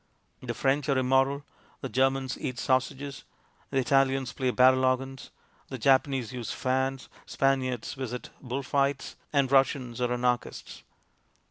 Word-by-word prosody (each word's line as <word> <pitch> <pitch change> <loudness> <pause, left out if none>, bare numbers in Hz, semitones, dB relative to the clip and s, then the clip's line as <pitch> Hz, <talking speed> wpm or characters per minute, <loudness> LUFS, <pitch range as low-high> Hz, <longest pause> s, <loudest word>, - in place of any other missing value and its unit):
The 120 -2 -4
French 140 +4 +1
are 135 - +3
im 130 -1 0
moral, 135 +2 +2 0.4
the 135 - -3
Germans 135 0 +1
eat 125 -1 -4
sausages, 135 +3 -1 0.5
the 135 - -2
Italians 135 -1 +2
play 130 -1 -1
barrel 130 +1 +5
organs, 130 +1 -1 0.4
the 130 - -6
Japanese 130 -1 +2
use 120 -2 -5
fans, 130 +1 -1 0.2
Spaniards 130 -3 0
visit 125 -2 -6
bull 130 +1 -4
fights, 140 +1 0 0.2
and 140 -3 +2
Russians 135 -3 +2
are 125 0 +1
anarchists. 125 0 -2
130 Hz, 135 wpm, -28 LUFS, 125-135 Hz, 0.5 s, barrel